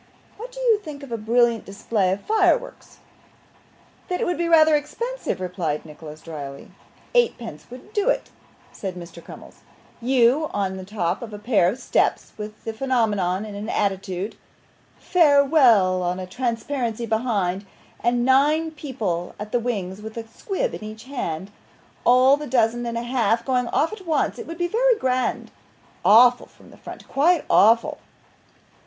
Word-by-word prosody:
'What 480 +3 -9
do - - -10
you 470 -4 +3
think 300 -7 -9
of 275 - -10
a - - -1
brilliant 230 +1 +2
display 200 -1 -1
of 195 +2 -2
fireworks?' 465 +3 0 1.1
'That 360 - -2
it - - 0
would 355 - -2
be 340 0 0
rather 315 -2 +6
expensive,' 470 - -3
replied 175 -5 -3
Nicholas, 155 0 -11
drily. 145 -4 -8 0.4
'Eighteen 485 -1 +3
pence 225 -11 -9
would 255 - -12
do 420 +2 +1
it,' - - -1 0.4
said 190 -3 -6
Mr. 175 -1 -10
Crummles. - - -13 0.4
'You 255 +4 +3
on 190 -2 -1
the 190 - -8
top 190 -4 -2
of 225 -3 -8
a - - -5
pair 210 -4 +2
of 220 - -4
steps - - 0
with 210 0 -9
the 225 - -4
phenomenon 215 -6 0
in 210 - -8
an 205 +2 -6
attitude; 195 0 -2 0.6
"Farewell!" 280 - +4
on 180 +1 -2
a 185 - -5
transparency 235 +2 -3
behind; 210 -4 -1 0.4
and 240 +1 +1
nine 300 +5 +3
people 220 - -4
at 210 +1 -7
the 245 - +2
wings 205 -5 -3
with 220 +1 -9
a 225 -1 -6
squib 405 - -3
in - - -7
each 215 +1 -8
hand 195 - -5 0.5
all 255 +3 +6
the 295 0 -7
dozen 240 -1 +1
and 230 0 -3
a 235 - -3
half 235 -2 0
going 250 -2 0
off 315 - 0
at 385 -5 -10
once 315 - 0
it 460 - -7
would 330 - -7
be 350 0 0
very - - +3
grand 255 -4 -1 0.5
awful 245 +3 +6
from - - -19
the - - -16
front, - - -11
quite 320 +4 +2
awful. 230 +3 +4
235 Hz, 165 wpm, -23 LUFS, 200-290 Hz, 1.1 s, rather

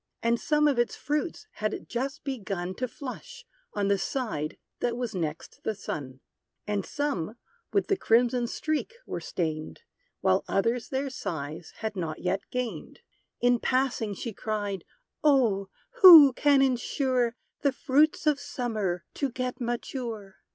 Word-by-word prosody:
And 235 0 +2
some 300 -1 +3
of 275 -4 +2
its 240 - +1
fruits 300 +8 -2
had 215 0 -3
just 270 +5 -3
begun 195 -9 -3
To 255 - -1
flush, 475 - -8 0.3
on 205 -1 +1
the 200 -1 +2
side 175 - -2 0.2
that 240 -1 -1
was 245 -3 -3
next 160 -4 -4
the 220 - -1
sun; 135 -8 -6 0.4
And 205 -1 -1
some 225 - -2 0.4
with 400 - +2
the 395 - +2
crimson 240 -2 +3
streak 310 - -2
were - - -4
stained; 155 - -3 0.4
While 95 - +3
others 230 +4 0
their 270 0 -2
size 160 - -5
had 220 -1 -2
not 165 -4 -3
yet 185 +2 -1
gained. 250 -2 -4 0.4
In 245 0 +4
passing 255 -6 0
she 230 +3 -5
cried, 205 -3 -3 0.4
"Oh! 235 -10 +3 0.3
who 320 -8 +11
can 280 +1 +4
insure 255 -1 +1 0.3
The 280 - +3
fruits 295 +3 +2
of 300 -2 +3
Summer 215 -11 -2
to 280 - -1
get 255 +1 -4
mature? 235 -4 -4
240 Hz, 145 wpm, -28 LUFS, 195-270 Hz, 0.4 s, who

